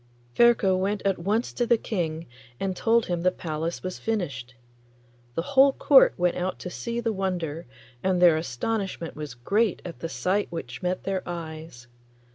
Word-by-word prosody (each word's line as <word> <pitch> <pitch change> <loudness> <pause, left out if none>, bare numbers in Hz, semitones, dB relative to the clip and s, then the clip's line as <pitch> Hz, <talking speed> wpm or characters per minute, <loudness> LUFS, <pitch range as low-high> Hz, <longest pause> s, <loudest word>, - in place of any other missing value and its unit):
Ferko 235 -5 +5
went 195 +2 -1
at 195 -3 +1
once 210 +7 0
to 240 - -1
the 235 - +4
King 165 -7 -3 0.3
and 190 -1 -2
told 230 +3 +2
him 175 -1 -2
the 180 - +4
palace 165 -1 -4
was 185 0 -5
finished. 140 - -3 0.8
The 165 - -1
whole 270 0 +7
court 270 -1 +6
went 180 0 +1
out 180 +1 -2
to 180 - -6
see 235 +4 -4
the 230 -1 -1
wonder, 175 -6 -3 0.3
and 185 -1 +1
their 175 -2 +7
astonishment 170 - -3
was 150 -4 -7
great 200 - +1
at 175 - -7
the 165 - -4
sight 195 +4 -1
which 135 -6 -6
met 180 0 -2
their 195 -1 -1
eyes. 160 -7 -7
180 Hz, 170 wpm, -26 LUFS, 165-205 Hz, 0.8 s, whole